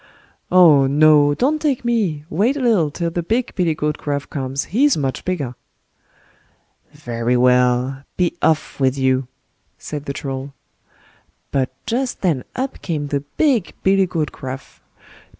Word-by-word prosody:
"Oh, 155 -7 +6
no! 145 0 +5
don't 300 - +1
take 275 -6 0
me, 195 -11 0
wait 220 - +1
a - - -3
little 220 - +2
till 170 +3 -3
the 175 - -2
big 230 +8 -1
billy 175 -4 0
goat 150 -1 -2
Gruff 145 -1 -3
comes, 135 -1 -3
he's 280 +5 +4
much 135 -3 -2
bigger." 150 -9 -3 1.4
"Very 120 +1 -2
well! 125 +1 +2 0.2
be 180 -2 +1
off 160 -2 0
with 135 0 +1
you", 130 -1 +1 0.5
said 150 -1 -7
the 140 - -3
Troll. 135 0 -6 1.0
But 135 -2 0 0.2
just 250 +2 -2
then 160 -9 0
up 260 +1 -4
came 150 -5 -3
the 140 - 0 0.2
big 265 - +1
billy 195 0 +3
goat 160 -4 -2
Gruff. 130 0 -8
150 Hz, 145 wpm, -20 LUFS, 135-195 Hz, 1.4 s, Oh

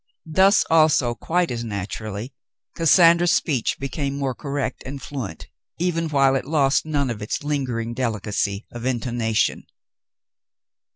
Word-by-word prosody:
Thus, 190 +5 +4
also, 155 -6 +4
quite 175 +7 -1
as 120 -1 -3
naturally, 105 +2 -5 0.4
Cassandra's 170 +1 +5
speech 135 -8 0
became 140 0 -3
more 135 -2 -1
correct 140 +2 -4
and 140 +1 -6
fluent, 125 - -7 0.3
even 165 -1 -1
while 135 -2 +3
it 135 - -1
lost 145 0 +2
none 140 -4 0
of 110 -2 -6
its 105 - -3
lingering 125 -6 -2
delicacy 105 -4 -2
of 120 -1 -8
intonation. 120 -3 -1
135 Hz, 125 wpm, -23 LUFS, 115-155 Hz, 0.4 s, Cassandra's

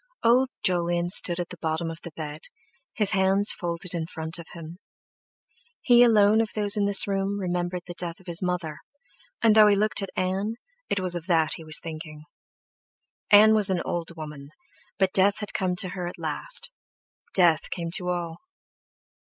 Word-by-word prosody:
Old 250 +3 +3
Jolyon 175 -1 0
stood 180 -3 +4
at 175 - -4
the 180 - -11
bottom 160 +1 -2
of 165 - -10
the - - -8
bed, 150 -1 -7 0.5
his 210 -3 +2
hands 195 +1 +2
folded 170 +1 -5
in 165 -2 -3
front 160 +1 -5
of 170 - -10
him. 170 +1 -10 1.0
He 240 -1 +4
alone 220 -2 +5
of 225 - -2
those 205 -1 +3
in 205 -1 0
the 200 -1 +5
room 195 0 -2
remembered 180 -1 -3
the 175 - -8
death 170 -1 -4
of 190 - -21
his 170 -1 -1
mother, 180 -4 -3 0.6
and 225 -2 +5
though 215 -1 +7
he 205 - +4
looked 215 +1 0
at 195 - -5
Ann, 190 +4 -2 0.3
it 200 - 0
was 185 -1 -1
of 175 +1 -6
that 160 -3 +2
he 165 - -11
was 155 -1 -1
thinking. 155 -2 -9 1.1
Ann 215 +1 +7
was 210 -2 +6
an 185 -2 -1
old 170 -1 -4
woman, 150 -3 -9 0.5
but 190 -1 +1
death 200 +1 +5
had 210 -2 -7
come 185 -1 -1
to 185 +1 +2
her 180 -1 -5
at 175 - -8
last—death 485 - -2
came 170 -2 -5
to 180 -3 -5
all! 170 -2 -4
180 Hz, 180 wpm, -25 LUFS, 170-200 Hz, 1.1 s, though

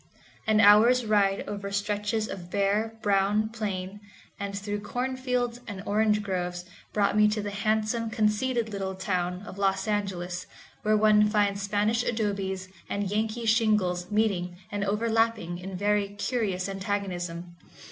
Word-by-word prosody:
An 215 -1 +4
hour's 225 +4 +6
ride 200 -2 +2
over 200 -1 -5
stretches 210 +2 -1
of 175 -2 -7
bare, 205 +3 0
brown 205 +2 +2
plain, 205 -3 -4 0.4
and 200 0 -4
through 205 +1 -3
cornfields 250 +1 -2
and 200 -2 -6
orange 210 0 +2
groves, 180 -2 -3 0.3
brought 205 -1 +1
me 210 0 +6
to 210 +1 0
the 205 -1 -3
handsome, 215 +2 0
conceited 220 +2 +1
little 195 -2 -3
town 180 -1 -2
of 200 -1 -9
Los 195 +2 +1
Angeles, 185 -4 -2 0.3
where 215 0 +3
one 210 0 +5
finds 205 -2 +1
Spanish 210 +3 +1
adobes 195 -5 -2 0.2
and 200 -1 -2
Yankee 220 +2 -1
shingles 210 -6 +2
meeting 195 -5 0
and 205 -1 -2
overlapping 220 -4 0
in 185 0 -6
very 205 +1 +1
curious 205 -2 -2
antagonism. 180 -3 -4
205 Hz, 135 wpm, -27 LUFS, 195-215 Hz, 0.4 s, hour's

